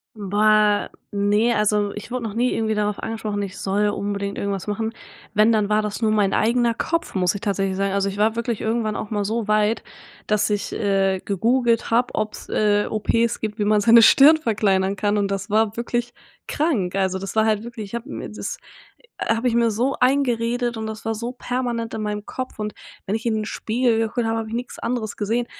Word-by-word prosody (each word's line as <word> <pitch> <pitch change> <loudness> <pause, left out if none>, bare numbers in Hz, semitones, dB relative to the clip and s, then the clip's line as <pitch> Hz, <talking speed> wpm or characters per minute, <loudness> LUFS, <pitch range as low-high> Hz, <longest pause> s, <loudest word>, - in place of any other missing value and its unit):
Boah, 210 0 +2 0.2
ne, 205 +3 +2
also, 210 -1 +1
ich 210 +1 -8
wurde 250 -1 -3
noch 220 -3 -4
nie 245 +3 +1
irgendwie 220 -1 0
darauf 210 -1 -1
angesprochen, 215 -2 -3
ich 195 -2 -7
soll 205 +2 +1
unbedingt 200 0 -3
irgendwas 200 -2 -3
machen. 220 +2 -2 0.4
Wenn, 215 +2 +5
dann 210 -2 +1
war 215 0 +2
das 210 +2 -4
nur 220 - +2
mein 205 -2 +2
eigener 235 +1 +2
Kopf, 335 +8 -2
muss 180 0 +1
ich 205 - -5
tatsächlich 195 -3 -1
sagen. 195 0 0
Also, 200 0 +1
ich 195 - -7
war 215 +2 +2
wirklich 235 -1 -2
irgendwann 220 -1 -1
auch 215 - -5
mal 205 -1 0
so 220 +2 -2
weit, 215 +1 +2 0.4
dass 210 0 +1
ich, 205 +1 -2
äh, 195 -2 +1
gegoogelt 230 +4 +1
habe, 240 +2 +2
ob's, 215 0 -4
äh, 205 -1 +2
OPs 230 +2 0
gibt, 215 0 -4
wie 205 - +1
man 210 0 +3
seine 230 +2 +7
Stirn 280 +7 +7
verkleinern 200 -7 +1
kann, 205 +1 0
und 200 -1 0
das 195 -1 -3
war 220 0 +2
wirklich 240 0 -2 0.4
krank. 235 - 0
Also 190 -1 0
das 195 +2 -6
war 220 0 +4
halt 215 -1 +1
wirklich 235 -2 -7
ich 195 - -14
habe 235 +4 -6
mir - - -5
das - - -5 0.7
habe 225 +2 +1
ich 240 - +1
mir 235 0 +3
so 240 +6 0
eingeredet 245 -2 +1
und 220 0 -4
das 220 +1 -7
war 225 - 0
so 235 +3 -4
permanent 245 -2 -3
in 220 - -3
meinem 210 0 -3
Kopf 255 -1 -6
und 210 -1 -4 0.3
wenn 195 - -2
ich 220 +1 -2
in 225 - +1
'n 215 0 -2
Spiegel 230 +2 0
geguckt 225 +1 -1
habe, 225 0 0
habe 225 - -5
ich 225 - -4
nix 245 +2 -5
anderes 235 -3 -3
gesehen. 225 +3 -1
215 Hz, 215 wpm, -22 LUFS, 205-235 Hz, 0.7 s, seine